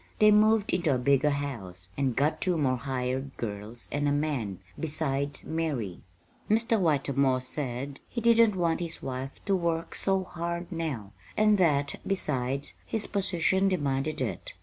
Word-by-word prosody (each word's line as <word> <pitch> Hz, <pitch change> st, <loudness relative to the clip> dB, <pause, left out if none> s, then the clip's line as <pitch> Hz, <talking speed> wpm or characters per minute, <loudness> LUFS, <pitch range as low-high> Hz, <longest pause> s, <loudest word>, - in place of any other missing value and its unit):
They 215 Hz, 0 st, +6 dB
moved 215 Hz, 0 st, +4 dB
into 170 Hz, -6 st, +2 dB
a -, -, +1 dB
bigger 140 Hz, +3 st, +3 dB
house, 115 Hz, -12 st, -4 dB
and 130 Hz, -2 st, 0 dB
got 145 Hz, +3 st, +1 dB
two 180 Hz, -3 st, +2 dB
more 135 Hz, -4 st, +2 dB
hired 130 Hz, +1 st, -3 dB
girls 110 Hz, +1 st, -6 dB
and 145 Hz, 0 st, 0 dB
a -, -, +2 dB
man, 145 Hz, -10 st, -1 dB, 0.2 s
besides 145 Hz, -3 st, -2 dB
Mary. 145 Hz, -, -2 dB, 0.5 s
Mr. 225 Hz, +1 st, +3 dB
Whitermore 140 Hz, -5 st, +2 dB
said 135 Hz, 0 st, -4 dB
he 235 Hz, -, -3 dB
didn't 230 Hz, -2 st, +5 dB
want 170 Hz, -3 st, +1 dB
his 170 Hz, -2 st, -5 dB
wife 130 Hz, +1 st, -5 dB
to 195 Hz, -, +3 dB
work 170 Hz, -2 st, -1 dB
so 195 Hz, -1 st, +1 dB
hard 170 Hz, 0 st, -4 dB
now, 145 Hz, -, -3 dB, 0.3 s
and 215 Hz, -1 st, +4 dB
that, 145 Hz, -5 st, +2 dB
besides, 140 Hz, -7 st, -1 dB
his 220 Hz, -2 st, -2 dB
position 190 Hz, -1 st, +2 dB
demanded 145 Hz, -3 st, -1 dB
it. 125 Hz, -, -3 dB
145 Hz, 150 wpm, -28 LUFS, 130-180 Hz, 0.5 s, They